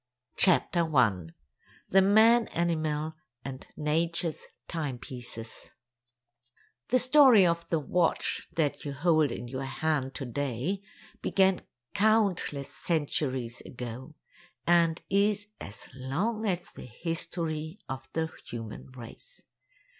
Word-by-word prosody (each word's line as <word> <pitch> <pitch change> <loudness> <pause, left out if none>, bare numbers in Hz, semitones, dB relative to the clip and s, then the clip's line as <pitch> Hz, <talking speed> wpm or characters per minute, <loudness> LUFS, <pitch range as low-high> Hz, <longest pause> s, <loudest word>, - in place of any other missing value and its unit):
CHAPTER 175 -2 +4
ONE 110 - +1 0.5
The 195 - +6
Man 220 +4 +5
Animal 160 -2 -1 0.3
and 135 -1 -7
Nature's 165 +2 -1 0.2
Timepieces 125 -7 -6 1.2
The 255 - +3
story 255 -5 +7
of 170 -1 0
the 165 - +2
watch 165 +3 +1
that 145 -3 0
you 145 - -4
hold 155 +1 +3
in 120 - -5
your 130 +2 -4
hand 135 -1 -1
to 135 - -4
day 140 - -2 0.4
began 190 -1 +3 0.3
countless 200 -10 +1
centuries 135 -7 -1
ago, 125 +5 -8 0.5
and 170 -1 +3
is 205 +1 +2
as 105 +5 -9
long 185 - -2
as 180 -3 -2
the - - -10
history 165 - -3
of 130 0 -6
the 160 0 -1 0.2
human 115 -2 -7
race. 130 - -11
160 Hz, 110 wpm, -29 LUFS, 130-180 Hz, 1.2 s, story